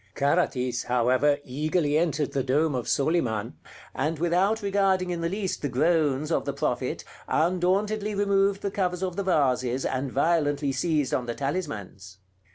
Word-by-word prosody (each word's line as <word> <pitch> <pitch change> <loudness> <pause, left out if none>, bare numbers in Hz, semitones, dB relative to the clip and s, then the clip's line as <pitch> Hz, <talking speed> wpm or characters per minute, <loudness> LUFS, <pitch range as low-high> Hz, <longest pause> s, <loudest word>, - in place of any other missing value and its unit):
Carathis, 130 -5 0
however, 125 +4 +2
eagerly 150 +3 0
entered 155 -3 +1
the 140 - 0
dome 145 +4 +1
of 125 -2 -3
Soliman, 125 -8 0 0.4
and 160 +1 -1
without 185 +7 +1
regarding 195 -2 +1
in 170 -1 -3
the 165 - 0
least 195 0 -3
the 145 - -2
groans 150 +1 +1
of - - +1
the - - -2
Prophet, - - -2 0.2
undauntedly 195 +5 +1
removed 200 0 +1
the 200 - -1
covers 180 -2 -1
of 180 -2 -2
the 200 - -1
vases, 130 -8 +1
and 130 0 -2
violently 145 -1 +1
seized 150 -2 0
on 125 - -1
the 120 - -3
talismans. 105 - -5
155 Hz, 155 wpm, -26 LUFS, 130-185 Hz, 0.4 s, however